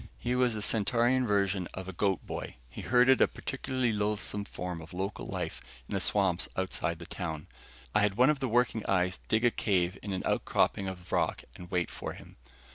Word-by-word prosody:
He 120 - -1
was 125 -2 +2
the 105 - -2
Centaurian 120 +4 +2
version 100 -3 +1
of 95 0 -6
a 95 - -5
goat 95 +1 0
boy - - -5 0.2
he - - -7
herded 125 +1 +5
a - - +7
particularly 130 -4 -2
loathsome 105 -1 -1
form 90 -3 -5
of 80 +2 -11
local 95 +3 -3
life - - -4 0.3
in - - -6
the - - +1
swamps 95 -4 +1
outside 90 -2 -1
the 85 - -9
town. 80 -4 -4 0.5
I - - +4
had 105 -1 +2
one 125 +6 +6
of 150 - -2
the 130 -2 -1
working 120 -1 +2
eyes 90 -1 +1
dig 110 +2 +2
a 120 - +5
cave 95 -4 +1
in 100 - -5
an 95 - -2
outcropping 95 - +1
of 90 -2 -7
rock - - +1
and 90 -1 -10
wait 90 -2 0
for - - -5
him. - - -14
100 Hz, 200 wpm, -30 LUFS, 90-120 Hz, 0.5 s, a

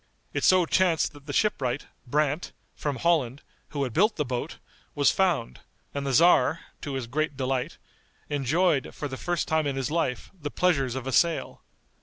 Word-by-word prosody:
It - - -2
so 185 -2 +5
chanced 170 -3 +2
that 145 0 -15
the - - -3
shipwright, 140 - 0 0.2
Brandt, 150 +4 0 0.2
from 145 -2 -3
Holland, 140 -5 +1 0.3
who 145 -2 -2
had 125 -4 -3
built 210 +5 +3
the 150 - -1
boat, 125 -1 -4 0.4
was 145 -1 +4
found, 175 - 0 0.3
and 140 -1 -3
the - - 0
tzar, 165 +2 +5 0.2
to 145 - -5
his 130 -2 -3
great 145 +3 -2
delight, 130 -1 -2 0.5
enjoyed, 145 +1 +1
for 145 - -4
the 130 - -6
first 175 +5 -2
time 160 -2 +1
in 140 - -1
his 135 +1 -2
life, 160 -6 -1
the 155 -6 -6
pleasures 140 -8 +1
of 130 -1 -4
a 135 - -2
sail. 165 +6 +1
145 Hz, 180 wpm, -27 LUFS, 135-170 Hz, 0.5 s, so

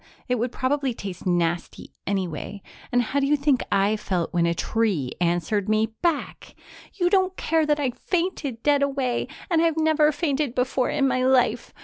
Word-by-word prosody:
It 250 -1 0
would 240 +1 -1
probably 265 -1 -1
taste 190 -4 -7
nasty 175 -1 -1
anyway. 190 0 -3 0.3
And 245 0 +3
how 275 +5 -1
do 275 - +1
you 295 - +4
think 280 -2 +2
I 200 +2 +3
felt 185 -5 -2
when 170 -1 +2
a 170 - 0
tree 195 - 0
answered 175 +4 0
me 215 +1 +1
back? 335 -4 -2 0.4
You 355 -3 +1
don't 375 0 +2
care 320 -1 +1
that 295 0 +2
I 270 -3 0
fainted 330 -7 -3
dead 290 -1 +3
away, 270 -3 0 0.2
and 325 -1 +4
I've 330 -1 +2
never 315 -1 +3
fainted 290 -4 -1
before 255 0 0
in 275 -2 +1
my 255 -1 +1
life. 255 -1 +2
255 Hz, 175 wpm, -24 LUFS, 200-295 Hz, 0.4 s, you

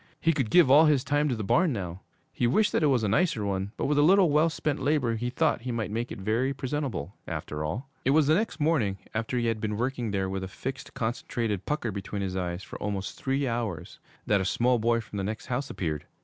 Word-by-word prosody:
He 165 - +3
could 135 -7 -1
give 170 -4 +6
all 150 +4 +8
his 145 -4 +3
time 145 +2 +1
to 125 - 0
the 110 - -4
barn 170 - +3
now. 95 -5 -4 0.3
He 120 - +1
wished 210 - +3
that - - +1
it 155 - +4
was 130 -5 +2
a - - +2
nicer 140 - +1
one, 100 0 -2
but - - -1
with 145 0 +2
a - - +6
little 180 +1 +5
well 155 +3 +4
spent 150 -2 -2
labor 130 -4 +1
he 120 +2 -2
thought 125 - +1
he 125 +1 -4
might 115 -3 -2
make 115 +3 -3
it - - -5
very 115 +7 0
presentable, 130 - -3
after 75 0 -4
all. 105 - -3 0.2
It - - +1
was 150 +2 +5
the 155 - +4
next 210 +1 0
morning, 145 -11 +1 0.2
after 115 +3 -2
he 120 - 0
had 115 -2 -1
been 105 -1 -2
working 125 -1 -1
there 95 -2 -1
with 95 0 -3
a - - -4
fixed, 130 +7 -6
concentrated 115 -4 -2
pucker 150 -7 -1
between 100 0 -4
his 95 -1 -3
eyes 90 0 -3
for - - -9
almost 100 -2 -3
three 135 +1 0
hours, 115 -8 -3 0.3
that 100 -2 +2
a - - 0
small 120 +5 +2
boy 115 +1 +2
from 110 -2 -9
the 100 - -1
next 110 +3 -4
house 130 +2 -2
appeared. 75 -4 -3
120 Hz, 250 wpm, -28 LUFS, 100-145 Hz, 0.3 s, all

